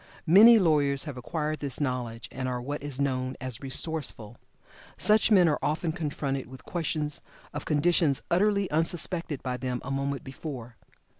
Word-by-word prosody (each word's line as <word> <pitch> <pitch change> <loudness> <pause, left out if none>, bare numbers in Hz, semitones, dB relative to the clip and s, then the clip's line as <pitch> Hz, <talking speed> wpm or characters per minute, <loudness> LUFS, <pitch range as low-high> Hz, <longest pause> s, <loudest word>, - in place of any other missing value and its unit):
Many 210 +8 +8
lawyers 145 -7 +2
have 145 -4 -6
acquired 155 +4 -3
this 140 -3 -4
knowledge, 125 -5 -3
and 130 0 -4
are 125 -1 -2
what 145 +4 -5
is 140 -2 -5
known 130 -2 -1
as 130 -2 -4
"resourceful." 135 -5 -3 0.6
Such 215 +1 +3
men 190 -5 +6
are 150 - +1
often 160 +2 -1
confronted 145 -5 -3
with 130 0 -13
questions 155 -3 -3 0.3
of 145 - -5
conditions 155 -1 +2
utterly 200 +2 +2
unsuspected 165 -1 0
by 125 -1 -2
them 125 0 -3
a 135 - -5
moment 140 0 -2
before. 130 -4 -8
145 Hz, 155 wpm, -28 LUFS, 130-165 Hz, 0.6 s, Many